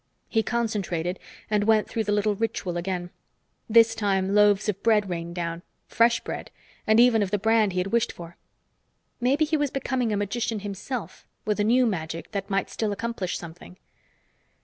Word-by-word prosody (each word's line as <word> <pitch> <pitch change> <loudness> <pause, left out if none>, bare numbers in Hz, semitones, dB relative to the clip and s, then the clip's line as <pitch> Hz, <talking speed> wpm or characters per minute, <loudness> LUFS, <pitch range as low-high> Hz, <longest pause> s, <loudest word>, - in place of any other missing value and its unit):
He 225 - +1
concentrated 195 -7 -2 0.3
and 210 -1 +1
went 220 -1 +3
through 225 -1 -2
the 205 - 0
little 205 0 +2
ritual 205 -4 -2
again. 175 0 -3 0.6
This 230 0 +6
time 195 -3 0
loaves 210 0 +4
of 200 -2 -2
bread 215 -3 +3
rained 170 0 -4
down 170 -1 -3 0.2
fresh 235 0 +3
bread, - - -6 0.4
and 220 +1 +5
even 240 -2 +5
of 200 - 0
the 205 - +1
brand 220 -1 +2
he - - -4
had 185 +2 -2
wished 235 0 +2
for. 170 0 -11 0.8
Maybe 275 +5 +2
he 310 +1 0
was 290 -1 0
becoming 260 -3 -1
a 210 - 0
magician 220 +2 -2
himself, 205 +4 -6 0.2
with 210 -1 0
a - - +3
new 245 +4 +4
magic 165 -6 -3
that 200 -2 -4
might 195 -1 -1
still 220 -2 -2
accomplish 205 -3 -3
something. 175 +2 -11
210 Hz, 175 wpm, -25 LUFS, 185-230 Hz, 0.8 s, This